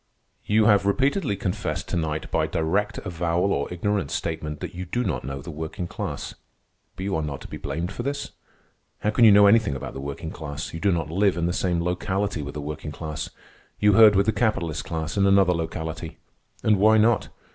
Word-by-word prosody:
"You 110 +1 +3
have 100 -2 +4
repeatedly 135 - +1
confessed 100 +1 -3
to - - -2
night, 75 -2 -2
by - - +1
direct 100 +6 0
avowal 85 +2 0
or 70 - -2
ignorant 100 +2 -1
statement, 75 -2 -3
that - - -6
you 90 +1 -5
do 120 +8 -2
not - - -2
know 70 +2 -5
the 85 - -7
working 80 +3 -5
class. - - -5 0.6
But 95 - -6
you 100 -2 -1
are 80 - 0
not 75 -3 -4
to - - -9
be - - -7
blamed 80 +6 -4
for 110 - -5
this. 140 +3 -3 0.7
How 105 - +1
can 115 +2 +5
you 110 - +9
know 100 0 +7
anything 100 -7 +4
about 65 - -6
the 65 - -6
working 70 +4 -5
class? 75 -2 -6
You 80 - -5
do 100 +4 +2
not 80 -3 -1
live 95 +1 +2
in 85 - 0
the 85 - 0
same 90 -2 0
locality 95 0 -1
with 70 0 -7
the 75 - -4
working 75 +1 -5
class. 75 0 -5 0.5
You 105 0 +5
herd 105 0 +8
with 100 +1 +4
the 110 - +3
capitalist 95 -8 -1
class 80 +3 -4
in 100 0 +4
another 95 -2 +5
locality. 80 0 -4 0.5
And 105 -2 +4
why 110 +3 +5
not? 110 +1 +3
90 Hz, 210 wpm, -25 LUFS, 80-105 Hz, 0.7 s, you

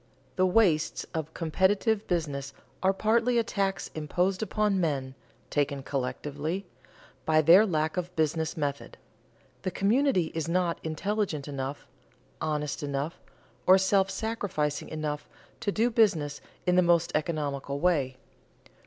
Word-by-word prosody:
The 185 - +3
wastes 180 -6 +2
of 160 -1 -3
competitive 195 +6 +1
business 140 -6 -2 0.3
are 190 - +4
partly 230 +5 +2
a 230 - +4
tax 195 -3 -2
imposed 180 +5 0
upon 210 -3 +1
men 135 -5 -1 0.4
(taken 140 -1 0
collectively) 145 +7 -3 0.6
by 155 0 +3
their 180 +8 +7
lack 155 -1 0
of 180 0 -3
business 160 0 0
method; 140 -2 -3 0.6
the 185 - -1
community 200 - +2
is 165 0 -2
not 175 -1 +1
intelligent 160 -1 -2
enough, 140 0 -5 0.6
honest 150 -2 -2
enough, 145 +2 -3 0.5
or 185 - +8
self 195 0 +3
sacrificing 200 -11 -2
enough 150 -2 -4 0.3
to 205 - -1
do 230 +4 +1
business 165 -11 +2 0.2
in 180 -1 +3
the - - +7
most 170 -1 +3
economical 145 -3 -2
way. 140 -7 +1
165 Hz, 125 wpm, -28 LUFS, 150-195 Hz, 0.6 s, or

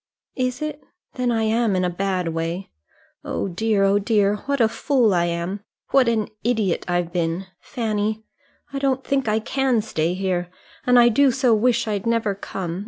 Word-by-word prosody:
"Is 255 +2 -1
it? 305 -1 -4 0.3
Then 250 -1 -1
I 225 -1 +1
am 220 -1 +1
in 185 0 +1
a - - +1
bad 185 -1 -1
way. 165 +3 -3 0.5
Oh - - -2
dear, 205 +2 +1
oh 195 +1 +4
dear, 205 -1 +2
what 280 -1 0
a 225 - +5
fool 230 -1 +2
I 175 -1 +2
am! 170 +3 -2 0.3
What 270 -3 +4
an 220 -3 +1
idiot 220 -6 0
I've 175 -1 -1
been! 170 +1 -1
Fanny, 220 -2 -2 0.5
I 275 - -2
don't 265 -1 0
think 270 -3 0
I 215 0 +2
can 260 +1 +1
stay 170 -5 -1
here; 185 -2 -1 0.4
and 250 0 +6
I 240 0 +7
do 275 +4 +4
so 255 -2 +2
wish 235 +1 +2
I'd 210 0 -2
never 230 -3 +1
come. 185 -3 -5
215 Hz, 180 wpm, -22 LUFS, 185-245 Hz, 0.5 s, I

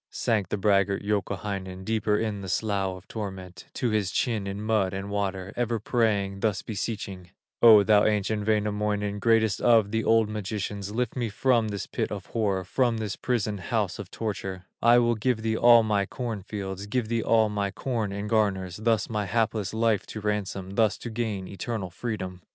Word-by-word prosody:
Sank 105 -6 0
the - - -1
braggart, 100 0 +2
Youkahainen, 100 -2 -3
Deeper 110 -1 +1
in 105 -2 -2
his 95 -2 -2
slough 100 -3 -1
of 95 - -16
torment, 95 -4 -7
To 120 - 0
his 105 -3 +1
chin 110 -2 -1
in 100 +1 -4
mud 105 -3 0
and 100 +1 -5
water, 95 -1 -2
Ever 120 -1 0
praying, 105 -4 0
thus 105 -1 0
beseeching: 100 -4 -5 0.3
"O 110 -3 +9
thou 105 0 +5
ancient 105 0 0
Wainamoinen, 105 -1 0
Greatest 115 -1 +2
of 115 -4 +4
the 110 0 0
old 115 -1 +4
magicians, 105 -1 -4
Lift 120 +1 -2
me 120 -3 -1
from 115 +1 +2
this 100 -2 -4
pit - - -3
of - - -5
horror, 100 -4 -1
From 120 +5 +1
this 110 -3 -3
prison 105 -5 -1
house 90 - -1
of - - -7
torture; 95 -4 -4 0.2
I 120 +1 +6
will 120 -1 +3
give 115 0 -1
thee 110 0 0
all 120 0 +7
my 105 -2 +1
corn 115 -5 -4
fields, 100 0 -6
Give 120 +1 -1
thee 115 0 0
all 110 -1 +3
my 100 -1 -1
corn 110 0 -2
in 100 +1 -4
garners, 100 -5 0
Thus 110 0 +1
my 105 -2 -2
hapless 110 -1 0
life 110 -2 +1
to 110 - -6
ransom, 100 -2 -3
Thus 110 +1 +2
to 120 - -7
gain 110 -5 -3
eternal 100 -1 -4
freedom." 95 -4 -5
105 Hz, 185 wpm, -27 LUFS, 100-110 Hz, 0.3 s, O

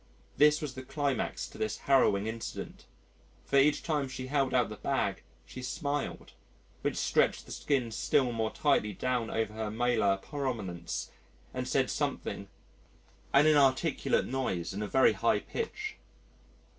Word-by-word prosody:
This 150 +1 +5
was 145 -4 -4
the 130 - -7
climax 140 0 -2
to - - -13
this 110 -1 -1
harrowing 125 -7 +3
incident 110 +1 -6 0.6
for 140 - +2
each 145 +2 +3
time 150 -4 0
she 130 0 -6
held 135 -1 +1
out 125 -3 +2
the 105 - -6
bag, - - -1 0.2
she 130 - -9
smiled, 140 +3 -3 0.5
which - - -1
stretched - - +2
the - - -12
skin 130 -6 0
still 125 +3 +2
more 110 -1 -1
tightly 105 -1 +1
down 125 +2 -1
over 110 -1 -1
her 110 -1 -3
malar 110 -3 +2
prominence 105 - -4 0.4
and - - -3
said - - +1
something - - -2 0.8
an 140 +2 +6
inarticulate 145 -1 +3
noise 95 -11 -2
in 100 - -4
a 105 - -2
very 130 +5 +5
high - - +2
pitch. 430 -2 -4
130 Hz, 145 wpm, -31 LUFS, 110-140 Hz, 0.8 s, an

